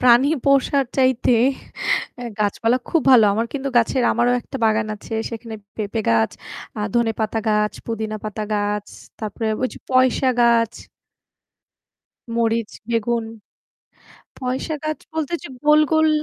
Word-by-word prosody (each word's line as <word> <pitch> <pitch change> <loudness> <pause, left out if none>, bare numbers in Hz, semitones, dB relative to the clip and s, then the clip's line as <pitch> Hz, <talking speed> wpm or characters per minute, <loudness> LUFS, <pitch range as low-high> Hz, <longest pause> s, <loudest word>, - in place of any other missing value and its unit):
প্রাণী 250 +3 +6 0.2
পোষার 275 0 +3
চাইতে 260 -2 +3 0.9
অ্যা 245 - -6
গাছপালা 225 +4 +1
খুব 330 - +2
ভালো। 240 -4 +8
আমার 225 +2 0
কিন্তু 275 -1 -3
গাছের 240 +2 +2
আমারও 240 +1 +2
একটা 270 - -7
বাগান 220 0 +2
আছে। 215 - -9 0.2
সেখানে 230 -1 -7 0.2
পেঁপে 215 +1 -2
গাছ, 115 -1 +3 0.5
আ - - -3
ধনেপাতা 225 -2 0
গাছ, 210 0 +2
পুদিনা 220 -1 -3
পাতা 215 0 -4
গাছ, 205 0 -1 0.3
তারপরে 220 +1 -3
ওই 255 - +2
যে - - -10
পয়সা 255 +1 +3
গাছ। 230 -1 +4 1.6
মরিচ, 230 -1 0 0.2
বেগুন। 230 0 0 1.1
পয়সা 260 +5 -3
গাছ 310 0 -2
বলতে 320 0 -2
ঐযে - - -10
গোল, 300 0 +6
গোল 315 0 +4
230 Hz, 135 wpm, -21 LUFS, 220-260 Hz, 1.6 s, ভালো